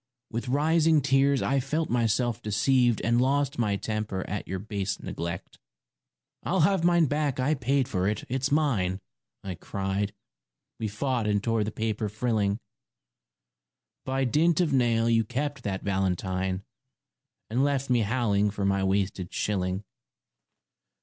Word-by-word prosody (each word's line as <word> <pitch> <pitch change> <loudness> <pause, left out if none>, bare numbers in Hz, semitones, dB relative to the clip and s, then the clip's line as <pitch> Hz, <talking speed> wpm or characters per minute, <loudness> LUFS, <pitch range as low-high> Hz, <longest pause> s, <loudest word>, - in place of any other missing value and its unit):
With 120 +2 -3
rising 155 +3 +3
tears 135 0 +3
I 135 0 +2
felt 155 +5 -1
myself 120 0 +1
deceived 120 +3 +2
And 120 +1 +2
lost 140 0 +1
my 105 -4 +1
temper 105 -2 -3
at 105 +1 -4
your 95 - -3
base 100 -1 -3
neglect. 85 0 -6 0.4
" - - -59
I'll - - +1
have 190 +1 +3
mine 175 -1 +4
back 145 -2 -1
I 135 +4 +2
paid 135 -1 +1
for 95 -6 0
it 105 0 -1
it's 130 +2 -1
mine! 115 -12 +1 0.2
" - - -59
I 95 - -4
cried. 95 +3 -2 0.7
We 110 - -1
fought 120 +2 -1
and 105 -1 +1
tore 115 -2 +1
the 105 - -3
paper 110 -1 -2
frilling. 105 -2 0 1.5
By 135 +1 -1
dint 155 +6 +3
of 165 -5 +2
nail 115 -3 +3
you 115 -1 +3
kept 140 +4 -3
that 95 -2 -2
valentine, 95 -1 -1 0.9
And 125 +4 +2
left 140 -2 0
me 120 - +4
howling 105 -2 +1
for 100 -1 -3
my 100 0 +1
wasted 95 -1 -1
shilling. 95 -1 -1
115 Hz, 150 wpm, -27 LUFS, 100-135 Hz, 1.5 s, mine